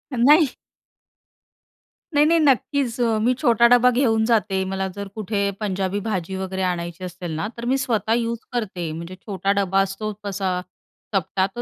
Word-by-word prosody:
नाही. 295 +6 +6 1.7
नाही-नाही, 310 +3 +4
नक्कीच 270 -3 +1
अ, 225 -2 +2
मी 250 +3 +3
छोटा 235 0 +5
डबा 245 +1 +6
घेऊन 225 -3 +2
जाते. 210 -5 +1
मला 190 0 -1
जर 200 0 -4
कुठे 200 -1 -1
पंजाबी 195 -1 -1
भाजी 190 -2 -2
वगैरे 190 0 -4
आणायची 175 0 -3
असेल 180 -1 -6
ना, 185 +6 -2
तर 235 - -5
मी 265 +2 +2
स्वतः 225 -4 0
यूज 235 0 0
करते. 190 -9 -3
म्हणजे 170 +3 -7
छोटा 195 0 -2
डबा 195 0 +2
असतो 195 +2 -3
तसा 190 -2 -1 0.5
चपटा, 190 +1 +1
तर 240 - -3
205 Hz, 155 wpm, -22 LUFS, 190-235 Hz, 1.7 s, नाही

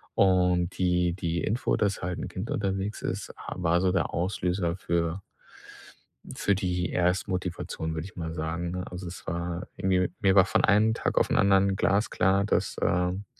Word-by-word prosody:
Und 90 -2 +3
die 90 -1 +2
die 85 -1 -2
Info, 115 +4 0
dass 100 -2 0
halt 90 0 -3
'n - - -4
Kind 95 +5 -6
unterwegs 100 +1 -2
ist, - - -3
äh, - - -10 0.2
war 85 -1 +2
so 95 -1 +2
der 95 -3 0
Auslöser 90 -1 -1
für 85 0 -1 1.1
für 100 - +1
die 90 -1 -1
Erstmotivation, 90 -3 -1
würde 80 0 -4
ich 100 - -14
mal 80 -2 -4
sagen, 80 +2 -3
ne? 90 0 -3
Also, 90 0 -7
es 85 +1 -9
war 85 +1 -3
irgendwie 90 -1 +1
mir 95 -1 +4
war 95 - +7
von 95 - +1
einem 110 +1 +4
Tag - - 0
auf - - +1
'n - - +2
anderen 95 0 +4
glasklar, 100 -1 +2
dass, 105 - 0
ähm 90 +3 0
90 Hz, 175 wpm, -27 LUFS, 85-95 Hz, 1.1 s, war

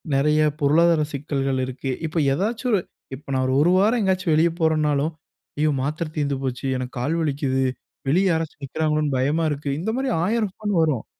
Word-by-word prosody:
நெறைய 150 +3 +3 0.2
பொருளாதார 160 +2 +4
சிக்கல்கள் 135 -2 -1
இருக்கு. 130 +1 -4 0.2
இப்போ 160 +2 -2 0.2
ஏதாச்சும் 225 - -1
ஒரு 200 - +3 0.3
இப்போ 140 +1 -15
நான் 130 0 +1
ஒரு 130 - 0
1 170 +4 +4
வாரம் 220 +5 +3
எங்கேயாச்சும் 185 -4 +1
வெளியே 165 +2 +4
போறேனாலும், 155 -2 +1 0.5
"ஐயோ 155 +1 +2
மாத்திரை 155 +3 -2
தீர்ந்து 140 -2 0
போச்சு, 130 -1 -3
எனக்கு 125 0 -5
கால் 145 +7 0
வலிக்குது, 135 -3 0 0.5
வெளிய 180 +7 +3
யாராச்சும் 160 -3 -3
நிக்கிறாங்களோன்னு 150 0 0
பயமா 150 +6 +1
இருக்கு." 145 0 -3
இந்த 190 +7 -2
மாதிரி 265 0 -1
1,000 215 -1 0
ஃபோன் 210 -1 -3
வரும். 150 -8 0
155 Hz, 170 wpm, -23 LUFS, 140-170 Hz, 0.5 s, பொருளாதார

